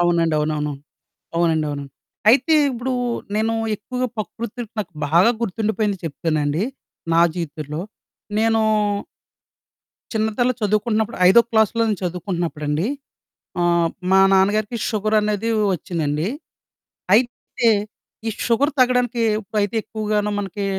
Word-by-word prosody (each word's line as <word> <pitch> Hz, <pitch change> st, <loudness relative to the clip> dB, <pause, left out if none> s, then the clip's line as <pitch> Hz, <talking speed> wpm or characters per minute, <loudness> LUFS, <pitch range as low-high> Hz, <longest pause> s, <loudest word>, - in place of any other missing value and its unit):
అవునండి. 170 Hz, -2 st, +2 dB
అవునవును. 150 Hz, -1 st, -1 dB, 0.6 s
అవునండవును. 155 Hz, -4 st, 0 dB, 0.5 s
అయితే, 265 Hz, +6 st, +4 dB, 0.2 s
ఇప్పుడూ 255 Hz, 0 st, -3 dB, 0.4 s
నేనూ 220 Hz, +1 st, +1 dB, 0.2 s
ఎక్కువుగా 250 Hz, +5 st, -3 dB
పకృతిలొ 230 Hz, +4 st, -5 dB
నాకు 195 Hz, -4 st, -4 dB, 0.2 s
బాగా 170 Hz, +9 st, +5 dB
గుర్తుండిపోయింది 215 Hz, -1 st, -1 dB
చెప్తానండి, 155 Hz, +1 st, -1 dB, 0.5 s
నా 165 Hz, -, +5 dB
జీవితంలో. 155 Hz, -2 st, -4 dB, 0.6 s
నేనూ... 225 Hz, 0 st, +3 dB, 1.5 s
చిన్నతనంలో 220 Hz, +3 st, +1 dB
చదువుకుంటన్నప్పుడు, 215 Hz, +2 st, 0 dB
ఐదో 215 Hz, +6 st, +8 dB
క్లాస్‌లో 220 Hz, +1 st, +3 dB
నేను 210 Hz, -3 st, 0 dB
చదువుకుంటన్నప్పుడండీ, 170 Hz, -3 st, -2 dB, 0.7 s
ఆహ్, 170 Hz, -1 st, +3 dB, 0.2 s
మా 190 Hz, -, +7 dB
నాన్నగారికి 205 Hz, +4 st, +2 dB
షుగరనేదీ 215 Hz, 0 st, 0 dB, 0.3 s
ఒచ్చిందండి. 160 Hz, -2 st, -2 dB, 0.9 s
అయితే, 240 Hz, 0 st, +1 dB, 0.6 s
ఈ -, -, +2 dB, 0.2 s
షుగర్ 270 Hz, +6 st, +2 dB
తగ్గడానికీ, 250 Hz, -1 st, +2 dB, 0.2 s
ఉప్పయితే 205 Hz, +1 st, -2 dB
ఎక్కువగానో 210 Hz, -1 st, -1 dB
మనకీ, 200 Hz, 0 st, -4 dB
205 Hz, 95 wpm, -21 LUFS, 170-225 Hz, 1.5 s, ఐదో